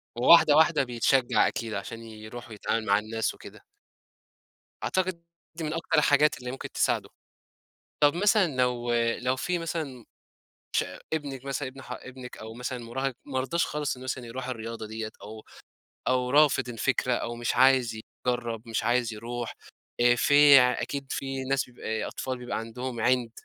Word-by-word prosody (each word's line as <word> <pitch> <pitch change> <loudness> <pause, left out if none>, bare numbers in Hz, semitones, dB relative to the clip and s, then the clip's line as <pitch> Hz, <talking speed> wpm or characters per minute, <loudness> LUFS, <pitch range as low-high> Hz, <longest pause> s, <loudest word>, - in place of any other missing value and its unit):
وواحدة 145 +4 +7
واحدة 160 -1 +5
بيتشجّع 125 +1 +2
أكيد 115 -2 -4
عشان 115 +3 -6
يروح 110 +2 -10
ويتعامل 110 +1 -2
مع 100 -1 +4
الناس 110 +1 -2
وكده. - - -13 1.2
أعتقد 185 -2 -1 0.3
دي 165 - -5
من 155 0 -2
أكتر 165 -1 -1
الحاجات 150 0 +4
اللي 125 0 -5
ممكن 135 - -7
تساعده. - - 0 0.9
طب 145 +1 +6
مثلًا 205 +2 +4
لو 120 -1 +1 0.3
لو 130 +1 0
في 180 +6 -1
مثلًا 155 -8 -4 0.7
ش - - +3 0.3
ابنِك 140 -4 -4
مثلًا، 135 -1 -2
ابن 135 +1 -12
ح - - -11
ابنِك 130 -1 -9
أو 110 0 -8
مثلًا 125 +2 -4
مُراهق 130 +3 -2
مرضاش 135 +5 0
خالص 150 -2 -2
إنه 125 - -11
مثلًا 130 -1 -4
يروح 125 +2 -6
الرياضة 115 -2 -5
ديّة 110 0 -5
أو 110 +1 -10 0.6
أو 125 -1 +1
رافض 145 -2 +4
الفكرة 125 +1 0
أو 120 0 -3
مش 120 0 -2
عايز 125 -3 +4 0.3
يجرّب، 120 -2 -2
مش 110 -1 -1
عايز 120 -1 +1
يروح 120 +2 -5 0.5
آآ 120 0 +6
في 145 +2 +7
ع 125 -1 +3
أكيد 140 -1 -4
في 135 -1 -3
ناس 135 0 +1
بيبقى 110 -3 -4
أطفال 130 -1 -4
بيبقى 125 0 -4
عندهم 120 +2 -5
عِند 125 0 +2
125 Hz, 160 wpm, -27 LUFS, 115-140 Hz, 1.2 s, وواحدة